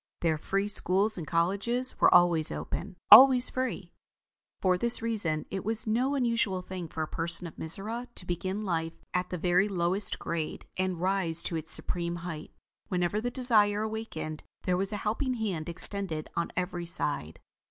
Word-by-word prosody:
Their 160 -2 0
free 195 +5 -2
schools 205 +1 +3
and 165 -4 -7
colleges 200 +9 -1
were - - +5
always 170 -3 +5
open: 195 0 -6 0.2
always 255 +3 +9
free. 240 -9 -4 0.7
For 185 -1 +2
this 235 +6 +3
reason, 205 -10 0
it 190 -1 -4
was 220 +1 -2
no 250 +6 0
unusual 230 -7 0
thing 180 -2 -7
for 160 0 -5
a - - -5
person 170 +2 -3
in 165 - -8
Mizora 215 +9 -4
to 180 - -3
begin 185 +4 -4
life 165 -3 -2 0.2
at 180 0 -2
the 180 - -4
very 180 +4 +1
lowest 185 +2 0
grade 165 -2 -5
and 185 -2 -2
rise 180 -3 +1
to 170 - -1
its 160 -1 0
supreme 170 -1 +1
height. 155 -3 -7 0.4
Whenever 180 +3 -1
the 245 - -2
desire 215 -5 +2
awakened, 220 -8 -6 0.2
there 180 - 0
was 195 +2 -1
a 210 - -3
helping 250 +5 -1
hand 190 -9 -4
extended 170 -2 0
on 170 - -2
every 175 -1 -3
side. 145 - -1
185 Hz, 170 wpm, -28 LUFS, 170-215 Hz, 0.7 s, always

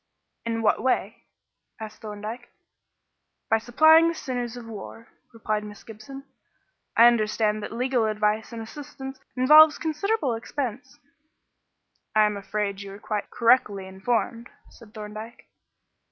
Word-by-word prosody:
"In 225 0 -2
what 215 - +2
way?" 255 +2 -1 0.5
asked 215 -1 -9
Thorndyke. 215 +3 -7 1.0
"By 225 - +4
supplying 315 +8 +5
the 335 - -1
sinews 245 -4 -4
of 240 - -9
war," 225 +1 -10 0.2
replied 215 -2 -2
Miss 210 -1 -11
Gibson. 230 +5 -10 0.7
"I 230 - +8
understand 215 -2 +2
that - - -6
legal 245 0 0
advice 215 +1 0
and 230 -1 -6
assistance 270 +1 -9 0.2
involves 305 +4 +7
considerable 320 - -1
expense." 250 +1 -5 1.2
"I 215 0 +6
am 210 0 0
afraid 200 0 -3
you 200 -1 -8
are 200 - -11
quite 215 -1 -4
correctly 230 -5 +2
informed," 230 +5 -2 0.2
said 230 -2 -17
Thorndyke. 215 +2 -9
225 Hz, 125 wpm, -25 LUFS, 210-255 Hz, 1.2 s, I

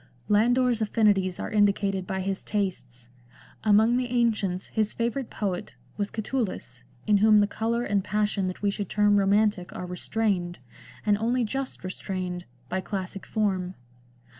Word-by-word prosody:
Landor's 240 +2 +3
affinities 205 -4 +2
are - - -4
indicated 200 -3 +2
by 190 -1 -2
his 195 0 -2
tastes. 130 - -3 0.5
Among 220 +3 +4
the 250 -1 0
ancients 220 -6 0
his 215 -1 0
favourite 235 +2 -2
poet 200 -1 -3 0.2
was 205 -1 -2
Catullus, 215 - -3 0.2
in 210 -1 +4
whom 215 +1 +6
the 205 - +5
colour 230 +3 -1
and 200 -4 0
passion 210 -2 0
that 185 +2 -6
we 200 - +3
should 200 -1 -4
term 205 -1 +3
romantic 200 -1 +2
are 180 - -4
restrained 180 -1 -1 0.2
— - - -19
and 205 -1 +3
only 240 +3 +1
just 265 +2 -4
restrained 185 -1 -4
— 125 0 -33
by 185 +7 -2
classic 190 0 -5
form. 190 -4 -1
205 Hz, 155 wpm, -26 LUFS, 185-220 Hz, 0.5 s, whom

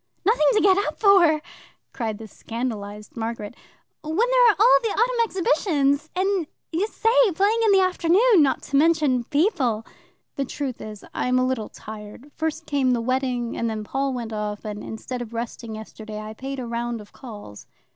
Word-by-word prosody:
"Nothing 400 -8 +4
to 425 - +3
get 385 0 +5
up - - -4
for?" 345 -7 +5 0.5
cried 220 -4 -3
the 220 0 -9
scandalized 210 -2 -6
Margaret. 225 -2 -4 0.5
"When 310 +1 -4
there - - +5
are 425 - +4
all 460 +5 +6
the 455 - -1
autumn 470 +3 +1
exhibitions, 310 -7 +1
and 375 -3 0 0.3
Ysaye 445 +2 +2
playing 410 +5 +2
in 430 - +5
the 390 -1 +5
afternoon! 370 +3 +4
Not 275 -2 +1
to 275 - 0
mention 295 -6 +3
people." 285 - +1 0.5
"The 275 - 0
truth 265 -1 -5
is, 215 -1 -9
I - - -1
am 250 0 +2
a 255 - +3
little 255 -4 -2
tired. 215 +6 -10
First 320 0 -3
came 270 -3 +1
the 240 - +1
wedding, 250 -1 -1
and 230 - -1
then 215 -1 -4
Paul 270 +5 -1
went 235 -3 -5
off, 210 -1 -4
and, 210 -1 -5
instead 245 +3 -6
of 235 -1 -7
resting 230 -1 -5
yesterday, 215 0 -8
I 215 0 -7
paid 270 +4 -6
a 250 - -4
round 235 0 -3
of 210 -1 -13
calls." 205 - -11
265 Hz, 180 wpm, -24 LUFS, 225-360 Hz, 0.5 s, all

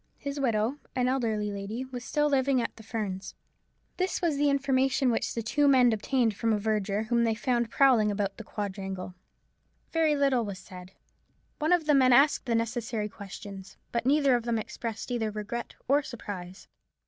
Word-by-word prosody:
His 280 0 -5
widow, 235 +1 0 0.2
an 250 -1 +1
elderly 220 -5 0
lady, 200 +5 -5
was 250 -2 -7
still 295 +3 +1
living 270 -2 +2
at 235 - -3
the - - -12
Ferns. 205 -4 -5 0.6
This 370 0 0
was 335 -4 +1
the 290 +1 +2
information 270 -2 +2
which 225 - -1
the 230 - -2
two 290 +6 +2
men 250 -4 +5
obtained 225 0 +1
from 225 +2 0
a 215 - +2
verger, 210 -1 0
whom 235 +1 +1
they 225 -1 +1
found 240 0 0
prowling 245 -5 +4
about 200 -1 -2
the 225 - -7
quadrangle, 195 -3 -5 0.8
Very 320 -2 +2
little 275 -4 +2
was 200 -3 -5
said. 185 0 -12 0.7
One 310 +2 +1
of 350 -3 +3
the 300 - +4
men 260 -2 +5
asked 275 +1 +4
the 230 - +1
necessary 230 -2 -2
questions. 195 -1 -10
But 235 +1 -1
neither 280 -1 +4
of 240 - 0
them 235 -1 0
expressed 225 +2 -5
either 225 -3 0
regret 215 +3 -5
or 285 +2 +4
surprise. 190 -8 -8
235 Hz, 180 wpm, -28 LUFS, 210-270 Hz, 0.8 s, men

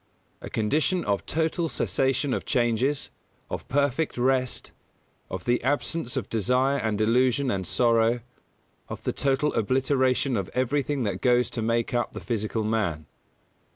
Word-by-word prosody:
A - - -7
condition 150 - 0
of 100 -1 -1
total 160 +1 0
cessation 135 -1 0
of - - -2
changes, 125 +3 0 0.4
of - - -5
perfect 140 +2 0
rest, 130 0 0 0.6
of 95 -1 -6
the 120 0 +1
absence 145 0 -1
of 120 - -2
desire 125 +5 +1
and 110 -2 -1
illusion 125 +4 +2
and 95 -3 -2
sorrow, 115 0 +3 0.7
of - - -7
the - - -1
total 140 +2 +1
obliteration 130 +2 +1
of 95 -2 -3
everything 135 +2 0
that 105 - -2
goes 125 -1 +3
to 115 - -3
make 115 +1 0
up 120 0 0
the - - -6
physical 110 -1 -2
man. 105 -9 -1
125 Hz, 145 wpm, -26 LUFS, 115-135 Hz, 0.7 s, sorrow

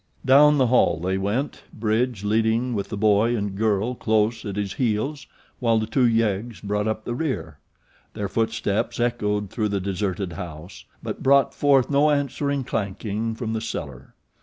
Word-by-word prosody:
Down 145 +3 +6
the 130 - +4
hall 125 -9 +3
they 95 +3 -1
went, 110 +9 -2
Bridge 110 0 -1
leading 110 +3 +1
with 100 -2 -3
the 105 - -4
boy 110 +3 +3
and 100 -2 -3
girl 110 +2 +1
close 110 -1 0
at 100 -2 -4
his 100 -2 -2
heels 130 +3 -1 0.3
while 115 -2 +2
the 110 - 0
two 120 +3 +2
yeggs 115 -1 0
brought 105 +1 -2
up 110 0 -3
the 120 - -2
rear. 120 - -3 0.6
Their 100 - -2
footsteps 110 0 -1
echoed 105 -4 -1
through 105 -2 -1
the 100 -1 -1
deserted 95 -1 -3
house; 85 +2 -9 0.2
but - - -5
brought 135 -1 +4
forth 140 -2 +3
no 145 +2 +4
answering 140 -1 0
clanking 110 +1 -3
from 115 -1 -4
the 110 - -2
cellar. 65 - -6
110 Hz, 165 wpm, -24 LUFS, 100-120 Hz, 0.6 s, Down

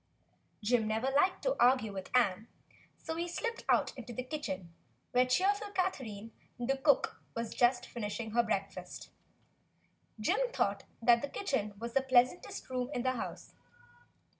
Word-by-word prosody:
Jim 225 0 +2
never 225 +5 0
liked 330 +7 +2
to - - +1
argue 245 -4 +4
with 190 -1 -6
Ann, 220 -2 +2 0.5
so 320 - -5
he 340 +1 -2
slipped 465 +7 -3
out - - +3
into 245 -2 -8
the 255 +2 -4
kitchen, 195 - -5 0.4
where 250 0 +4
cheerful 405 +10 +2
Catherine, 230 - -2 0.3
the 245 +3 0
cook, 275 0 +2
was 230 -1 -3
just 245 0 +3
finishing 220 0 -4
her 235 +2 +4
breakfast. 195 -5 -4 1.1
Jim - - +1
thought - - 0 0.2
the 240 +4 +4
kitchen 265 - -2
was 230 +2 -6
the 270 - +4
pleasantest 255 +4 +2
room 255 -1 -2
in 245 - -1
the 255 - +2
house. 255 - -6
245 Hz, 145 wpm, -33 LUFS, 220-275 Hz, 1.1 s, argue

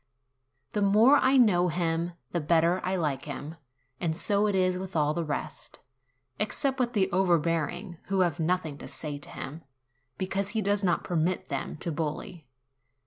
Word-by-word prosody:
The 210 - -1
more 215 +8 +6
I 270 0 +4
know 185 -8 +5
him, 170 0 -1 0.2
the 175 - 0
better 170 +3 +3
I 185 +1 0
like 150 -7 -1
him; 150 +2 -6 0.4
and 160 -2 -1
so 205 +3 +2
it 205 - 0
is 185 -1 +2
with 190 -1 -7
all 150 -1 +2
the 170 - -1
rest, 150 -2 -5 0.6
except 265 +6 0
with 245 -1 0
the 195 -4 +2
overbearing, 170 -1 0
who 195 -1 +1
have 175 -4 +1
nothing 160 -3 -1
to - - -8
say 145 -2 -5
to 140 - -5
him, 150 +5 -7 0.6
because 195 +1 -1
he - - +2
does 200 +1 +1
not 175 -2 +1
permit 175 +1 -1
them 140 +1 -3
to 170 - -2
bully. 160 - -4
175 Hz, 170 wpm, -28 LUFS, 160-195 Hz, 0.6 s, more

